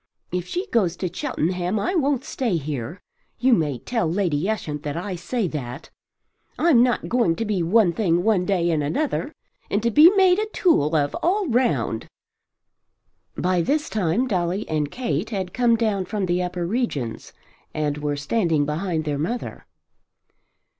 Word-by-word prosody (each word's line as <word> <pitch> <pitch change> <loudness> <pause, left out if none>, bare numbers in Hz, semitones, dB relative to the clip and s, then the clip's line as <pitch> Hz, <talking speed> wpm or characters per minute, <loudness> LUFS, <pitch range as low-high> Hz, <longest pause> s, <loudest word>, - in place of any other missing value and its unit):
If 180 0 -3
she 360 - -3
goes 185 -7 +2
to 180 -2 -4
Cheltenham 180 - -1
I 205 - -1
won't 285 -6 +1
stay 245 - -1
here. 150 +2 -5 0.4
You 255 +1 +3
may 150 - +1
tell 220 - -1
Lady 175 -2 0
Ushant 150 -9 -3
that 150 +1 -4
I 185 +2 -4
say 190 +5 -2
that. 130 -4 -6 0.7
I'm 310 -8 +5
not 245 -1 +1
going 235 -9 +2
to 225 - -2
be 205 -4 0
one 180 +1 +3
thing 175 -3 +1
one 210 -4 +2
day 180 -3 +1
and 155 -2 +1
another 165 - 0
another, 295 - -10 0.3
and 205 +2 0
to 235 - +2
be 305 +9 +8
made 375 -1 +5
a 430 - -1
tool 245 - +2
of 145 -2 +1
all 385 +3 +1
round." 150 - 0 1.3
By 180 -1 +1
this 295 - 0
time 210 +3 +1
Dolly 185 -1 -1
and 150 -2 -1
Kate 190 - -2
had 190 -5 -4
come 240 -2 +3
down 215 -4 0
from 200 +1 -2
the 180 0 0
upper 180 -1 -3
regions 170 - -3 0.4
and 150 -1 -2
were 145 -1 -2
standing 155 -1 +1
behind 160 +1 -2
their 145 -2 -2
mother. 230 +11 -4
185 Hz, 165 wpm, -23 LUFS, 160-235 Hz, 1.3 s, be